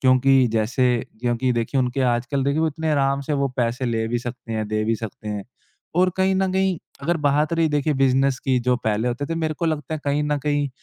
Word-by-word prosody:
क्योंकि 130 0 +5
जैसे 115 +3 +1 0.4
क्योंकि 120 +1 0
देखिए 120 +3 -1
उनके 125 +1 -1
आजकल 125 +3 -1
देखिए 140 +3 +1
वो 160 - +2
इतने 160 +1 -3
आराम 140 -2 +2
से - - +1
वो 140 - +3
पैसे 125 +1 0
ले 115 -1 0
भी 120 +1 0
सकते 120 -1 -7
हैं 110 -1 -2
दे 110 0 0
भी 115 - +1
सकते 105 -1 -6
हैं। 105 -2 -4 0.5
और 185 0 +4
कहीं 190 0 +2
न 190 0 +1
कहीं 190 -1 +1 0.3
अगर 170 +4 +1
बात 150 +1 +1
रही 165 -1 +2
देखिए 150 0 +1
बिज़नस 135 0 +2
की 130 -2 +2
जो 125 +1 +2
पहले 110 +2 +1
होते 125 +4 -3
थे 165 - -2
मेरे 160 -1 -1
को - - -1
लगता 155 -1 -2
है 155 - -5
कहीं 145 +1 +1
न 150 0 0
कहीं 145 -1 0
135 Hz, 235 wpm, -22 LUFS, 120-150 Hz, 0.5 s, क्योंकि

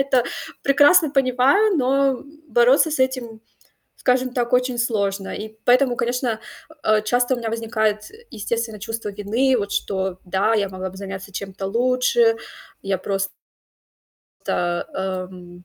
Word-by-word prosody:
это 270 -3 +2 0.4
прекрасно 290 +3 +5
понимаю, 270 - +3
но 270 -1 +2 0.3
бороться 250 +6 +4
с 305 - -2
этим, 255 -4 -1 0.5
скажем 255 0 +1
так, 240 -1 -1
очень 250 -1 +1
сложно. 200 -4 -1
И 220 +1 -8
поэтому, 250 0 +4
конечно, 240 -2 -1 0.3
э, 315 - -15
а, 215 0 +3
часто 245 +3 +1
у - - -4
меня 230 -2 -3
возникает, 220 -2 -1
э, 455 +2 -17
естественно, 225 -1 -3
чувство 225 -1 -4
вины. 220 +7 +1
Вот 200 -1 -3
что, 190 -2 -2
да, 190 +5 +1
я 200 -3 +1
могла 185 0 -5
бы 190 - -13
заняться 195 0 -7
чем-то 195 0 -5
лучше. 255 - +2 0.5
Я 195 -1 0
просто, 195 +1 -2 1.6
эм 185 -1 -5
230 Hz, 140 wpm, -22 LUFS, 200-255 Hz, 1.6 s, прекрасно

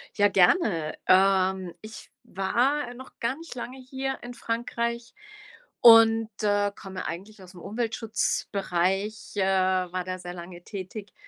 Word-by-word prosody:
Ja, 205 -1 +5
gerne. 180 - +3
Ähm, 190 -1 +3
ich 215 0 -11
war 245 +8 0
noch 260 +1 -13
gar 235 +3 -1
nicht 330 -6 -10
lange 250 +1 -6
hier 265 +1 -4
in 245 0 -8
Frankreich 235 0 -3 0.7
und, 225 -1 +7
äh, 205 -1 +2
komme 190 -3 -7
eigentlich 195 +6 -7
ausm 180 -1 -13
Umweltschutzbereich, 210 -3 -2
äh, 195 - +2
war 185 -1 +1
da 185 0 -4
sehr 175 0 -7
lange 175 0 -10
tätig, 200 +1 -8
205 Hz, 130 wpm, -26 LUFS, 185-235 Hz, 0.7 s, und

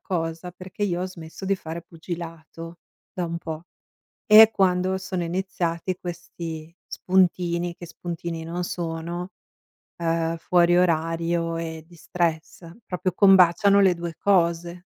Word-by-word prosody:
cosa, 165 -2 -3
perché 185 +3 -9
io 180 -2 -1
ho 185 - -1
smesso 170 0 -10
di 195 +1 +2
fare 165 -1 -7
pugilato 165 0 -8 0.3
da 180 - -3
un 170 0 -4
po'. 160 0 -6 0.6
E 220 +1 +9
quando 185 -1 +2
sono 185 -2 -3
iniziati 175 0 -2
questi 170 -2 -7
spuntini, 175 -2 +1
che 175 - -10
spuntini 170 -1 -6
non 175 +2 -3
sono, 170 +1 -4 0.7
uhm, 165 0 0
fuori 175 +1 +3
orario 165 0 0
e 160 -1 -6
di 175 +1 -17
stress, 165 0 -3 0.2
proprio 180 0 -2
combaciano 195 +1 +5
le 190 -2 +5
2 170 -1 -6
cose. 170 -3 +2
170 Hz, 130 wpm, -24 LUFS, 165-180 Hz, 0.7 s, E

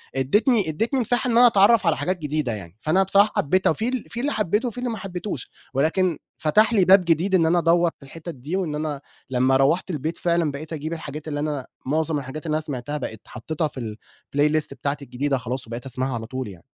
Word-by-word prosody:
ادتني 205 - +2
ادتني 225 - 0
مساحة 245 +1 +1
إن 230 - +2
أنا 245 +1 +8
اتعرّف 205 -2 +5
على 165 - +3
حاجات 180 +6 -1
جديدة 150 -5 -2
يعني، 95 -3 -9
فأنا 180 +5 +3
بصراحة 200 +2 +4
حبيتها 185 +3 +2
في 220 +8 -2
ال 255 -3 -3
في 235 - -5
اللي 285 +4 0
حبيته 210 - 0
وفي 240 - -6
اللي 250 0 -2
ما 225 - -3
حبيتوش، 185 -6 -4 0.2
ولكن 160 +5 +1 0.2
فتح 215 +9 +3
لي 195 -5 +4
باب 190 0 +6
جديد 170 +4 +2
إن 170 -3 +4
أنا 170 +2 +3
أدوّر 170 +1 +3
في - - -16
الحتت 165 +4 -8
دي 140 +8 -5
وإن 175 -6 -1
أنا 150 -2 -3 0.3
لمّا 130 +1 +3
روّحت 145 +8 +2
البيت 155 +1 -3
فعلًا 170 -3 +1
بقيت 155 +3 -7
أجيب 155 +1 -4
الحاجات 155 -2 -7
اللي 145 -2 -3
أنا 145 -3 -3 0.2
معظم 155 +2 0
الحاجات 140 +4 -7
اللي 155 -1 0
أنا 155 - 0
سمعتها 145 -1 -4
بقيت 110 -6 -6
حطّيتها 155 +7 -3
في 115 -7 -6 0.4
الplaylist 150 +1 +3
بتاعتي 140 +2 -3
الجديدة 135 +2 -1
خلاص 125 0 -3
وبقيت 115 +2 -6
أسمعها 130 0 -2
على 115 -1 -4
طول 130 +1 -5
يعني. 95 -4 -12
155 Hz, 220 wpm, -23 LUFS, 135-190 Hz, 0.4 s, أنا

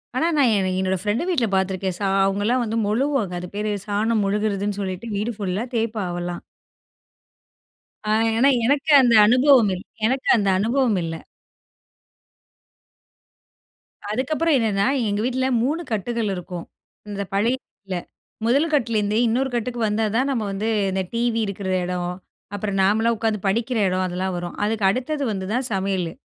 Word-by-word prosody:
ஆனா, 315 +6 +2
நான் 265 -5 +4
என 190 -1 0
என்னோட 190 0 0
ஃப்ரெண்டு 210 - 0
வீட்ல 275 -11 +1
பார்த்துருக்கேன். 190 -1 -1
சா 200 - 0 0.2
அவுங்கள்லாம் 205 +6 +1
வந்து 225 0 -2
மொழுகுவாங்க. 235 -3 0
அது 180 - -6
பேரு 210 +1 -1
சாணம் 215 +1 +1
மொழுகுறதுன்னு 205 0 -1
சொல்லிட்டு 190 +3 -4
வீடு 210 +4 -1
ஃபுல்லா 200 0 -2
தேய்ப்பா 225 -2 -1
அவள்லாம். 175 0 -4 1.6
ஆ - - -2 0.3
ஏனா 270 +4 +5 0.2
எனக்கு 285 +4 +2
அந்த 240 -3 +4
அனுபவம் 250 -2 +5
இல் 180 - -9 0.2
எனக்கு 260 +2 -1
அந்த 200 -3 +1
அனுபவம் 230 0 +1
இல்ல. 165 0 -4 3.0
அதுக்கப்பறம் 305 +7 +1
என்னன்னா, 205 -3 +1 0.2
எங்க 205 0 -1
வீட்ல 260 +1 0 0.2
3 300 +7 0
கட்டுகள் 225 +1 -1
இருக்கும். 180 -1 -7 0.4
இந்த 200 -1 -4
பழைய 220 +6 +2
வீட்ல. 195 -2 -8 0.5
முதல் 280 +7 +2
கட்லருந்தே 220 -6 +1
இன்னொரு 255 +4 +1
கட்டுக்கு 240 +1 -2
வந்தா 210 +1 0
தான் 260 +4 +2
நம்ம 235 -5 -1
வந்து 200 +3 -3 0.2
இந்த 190 0 -1
டிவி 230 0 0
இருக்கிற 200 -1 -4 0.2
எடம், 180 0 -2 0.5
அப்பறம் 200 -1 -2
நாமல்லாம் 220 +4 +2
உட்காந்து 220 -1 -1
படிக்கிற 230 +5 0
எடம். 185 0 0
அதெல்லாம் 185 +1 -3
வரும். 175 0 -5
அதுக்கு 215 -1 0
அடுத்தது 270 +7 -1
வந்து 190 -2 -3
தான் 250 +1 0
சமையலு. 190 -3 -1
215 Hz, 145 wpm, -22 LUFS, 195-240 Hz, 3.0 s, ஏனா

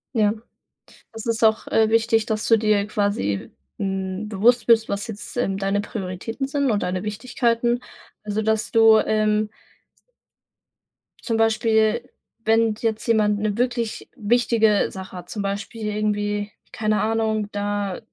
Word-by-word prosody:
Ja, 210 -2 +3 0.8
es 225 0 -8
ist 230 0 -1
auch, 220 0 +3
äh, 220 -1 +2
wichtig, 225 0 +3
dass 220 -1 -2
du 225 - +5
dir 210 -2 +2
quasi, 200 - -1 0.3
hm, 195 +1 -3
bewusst 220 +3 +3
bist, 225 -1 +5
was 200 +3 -3
jetzt, 220 +2 -7
ähm, 195 -5 0
deine 195 +1 0
Prioritäten 205 +4 -5
sind 280 -1 0
und 205 -2 0
deine 180 0 -2
Wichtigkeiten. 235 +2 0 0.4
Also 210 +1 -2
dass 220 0 0
du, 225 -1 +6
ähm 215 0 +1 1.7
zum 225 -2 -2
Beispiel, 225 0 +2 0.3
wenn 225 0 +3
jetzt 220 -2 -1
jemand 210 -2 +2
'ne 210 0 -1
wirklich 240 -2 -2
wichtige 225 -2 +2
Sache 190 -1 -9
hat 175 0 -10
zum 210 - -4
Beispiel 205 +3 -4
irgendwie, 205 0 -1 0.2
keine 215 -3 0
Ahnung, 220 -1 0
da 205 -2 -2
215 Hz, 140 wpm, -23 LUFS, 205-225 Hz, 1.7 s, du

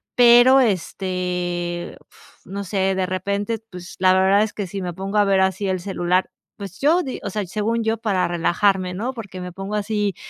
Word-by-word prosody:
pero, 245 +2 +7
este 180 -4 -2 0.5
no 200 +2 -5
sé 190 0 0
de 190 - 0
repente, 200 +4 -2
pues, 175 -3 -10
la 185 0 +5
verdad 190 +2 +4
es 215 - -4
que 205 - -4
si 195 +2 -5
me 175 -1 -4
pongo 195 +3 -4
a 205 - +5
ver 195 -1 +3
así 190 +1 0
el 185 -1 -1
celular, 180 -1 0 0.3
pues, 195 -2 -9
yo 325 +6 +3
di 260 - -5
o - - -3
sea, 210 -2 -3
según 220 +5 -1
yo 225 +1 0
para 205 -5 0
relajarme, 180 +2 +1
¿no?, 245 +7 -3
porque 195 -6 -8
me 180 0 -6
pongo 195 +3 -5
así, 210 -1 -1
195 Hz, 190 wpm, -21 LUFS, 180-210 Hz, 0.5 s, pero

